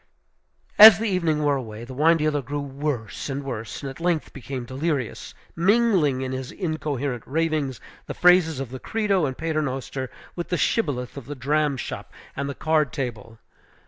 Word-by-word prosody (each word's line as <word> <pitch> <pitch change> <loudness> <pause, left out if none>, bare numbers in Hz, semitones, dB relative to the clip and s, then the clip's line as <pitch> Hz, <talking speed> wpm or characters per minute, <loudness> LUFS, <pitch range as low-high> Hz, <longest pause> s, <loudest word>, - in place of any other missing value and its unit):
As 215 -1 +12
the 225 - -2
evening 165 -6 +1
wore 145 -1 +2
away, 110 -3 -7
the 130 - -9
wine 160 +5 +4
dealer 150 -2 0
grew 145 +3 -4
worse 140 -6 -4
and 140 +1 -3
worse, 115 -2 -6
and 135 - -3
at 135 - -13
length 170 -2 -1
became 130 -2 -6
delirious, 135 -1 -3 0.2
mingling 185 - +3
in 130 - -3
his 130 -1 -5
incoherent 145 - -3
ravings 150 - -1 0.3
the - - -5
phrases 180 -5 +4
of 135 -3 -5
the 130 - -6
Credo 200 - 0
and 130 - -5
Paternoster 135 -5 -3 0.3
with 175 - -5
the 180 - 0
shibboleth 140 - -1
of 135 - -8
the 145 - -5
dram 145 +2 0
shop - - -6 0.2
and 140 0 -3
the 140 - -5
card 155 -3 +1
table. 115 -4 -5
145 Hz, 175 wpm, -24 LUFS, 130-160 Hz, 0.3 s, As